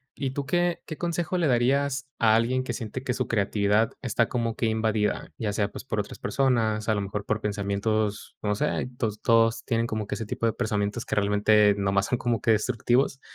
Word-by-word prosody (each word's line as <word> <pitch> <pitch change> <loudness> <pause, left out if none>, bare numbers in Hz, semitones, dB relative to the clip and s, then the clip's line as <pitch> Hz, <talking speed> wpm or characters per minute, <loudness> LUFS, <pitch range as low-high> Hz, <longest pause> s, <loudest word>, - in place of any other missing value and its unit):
¿Y 135 -2 -2
tú 140 +1 -4
qué 175 +3 0
qué 155 - -7
consejo 175 +1 -1
le 170 -3 +2
darías 140 +3 +1
a 110 -1 +5
alguien 125 +3 +1
que 120 - -3
siente 115 +2 -5
que 130 -1 -2
su 130 +1 -3
creatividad 105 +1 +2
está 115 -2 +1
como 115 -2 -2
que - - 0
invadida? 110 -1 0
Ya 105 -3 -2
sea, 105 0 0
pues, - - -9
por 110 -5 -1
otras 100 - -10
personas, 110 -2 +1
a 110 - +3
lo - - 0
mejor 100 +1 -4
por 110 0 0
pensamientos, 105 +1 -1
no 105 -1 +1
sé, 150 +1 -1
todos 110 -3 -2
todos 115 -1 +3
tienen 115 -2 0
como 110 -2 -3
que - - -4
ese 110 - -5
tipo 110 - -3
de 115 - +3
pensamientos 110 0 -2
que - - -2
realmente 105 0 +4
nomás 100 0 +1
son 125 - 0
como 120 -3 -1
que 115 - +3
destructivos. 120 +5 +1
110 Hz, 210 wpm, -26 LUFS, 105-125 Hz, -, a